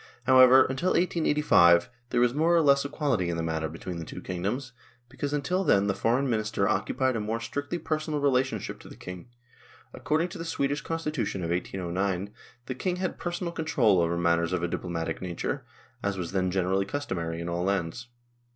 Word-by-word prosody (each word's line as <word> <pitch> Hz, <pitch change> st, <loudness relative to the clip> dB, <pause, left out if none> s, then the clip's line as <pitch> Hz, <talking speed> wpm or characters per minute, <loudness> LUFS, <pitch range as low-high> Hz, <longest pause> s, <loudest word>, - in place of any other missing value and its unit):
However, 130 Hz, 0 st, +7 dB
until 135 Hz, +8 st, 0 dB
1885, 150 Hz, -, +4 dB, 0.2 s
there -, -, +1 dB
was 120 Hz, 0 st, +3 dB
more 165 Hz, +4 st, +3 dB
or 170 Hz, -, +5 dB
less 140 Hz, -1 st, +5 dB
equality 140 Hz, -, -1 dB
in 85 Hz, -, -2 dB
the 80 Hz, -, -2 dB
matter 80 Hz, -1 st, -2 dB
between 85 Hz, +3 st, -6 dB
the -, -, -5 dB
two -, -, -8 dB
kingdoms, 105 Hz, +9 st, -3 dB, 0.4 s
because 140 Hz, +2 st, -4 dB
until 180 Hz, +6 st, 0 dB
then 100 Hz, -, +3 dB
the 100 Hz, -, +1 dB
Foreign 125 Hz, +7 st, +1 dB
Minister 110 Hz, -4 st, 0 dB
occupied 110 Hz, +5 st, 0 dB
a -, -, 0 dB
more 110 Hz, +2 st, -2 dB
strictly 145 Hz, +7 st, -4 dB
personal 155 Hz, -2 st, -2 dB
relationship 135 Hz, -2 st, 0 dB
to -, -, -13 dB
the -, -, -11 dB
King. 90 Hz, +3 st, -9 dB, 0.7 s
According 160 Hz, +4 st, 0 dB
to 180 Hz, 0 st, -9 dB
the -, -, -3 dB
Swedish 145 Hz, -3 st, -1 dB
constitution 150 Hz, -, -3 dB
of 85 Hz, -, -2 dB
1809, 95 Hz, +2 st, -2 dB, 0.3 s
the 130 Hz, -, -3 dB
King 180 Hz, +8 st, -2 dB
had 185 Hz, 0 st, -3 dB
personal 175 Hz, 0 st, -3 dB
control 120 Hz, -, +2 dB
over 85 Hz, 0 st, 0 dB
matters 85 Hz, 0 st, +1 dB
of 90 Hz, -2 st, -1 dB
a -, -, +1 dB
diplomatic 85 Hz, -2 st, -3 dB
nature, 90 Hz, -2 st, -3 dB, 0.4 s
as 100 Hz, -1 st, -2 dB
was 85 Hz, -2 st, -4 dB
then 95 Hz, -1 st, 0 dB
generally 95 Hz, +1 st, +1 dB
customary 90 Hz, -10 st, -3 dB
in 85 Hz, -, -5 dB
all 85 Hz, +1 st, -2 dB
lands. 100 Hz, +5 st, -2 dB
115 Hz, 185 wpm, -27 LUFS, 90-145 Hz, 0.7 s, However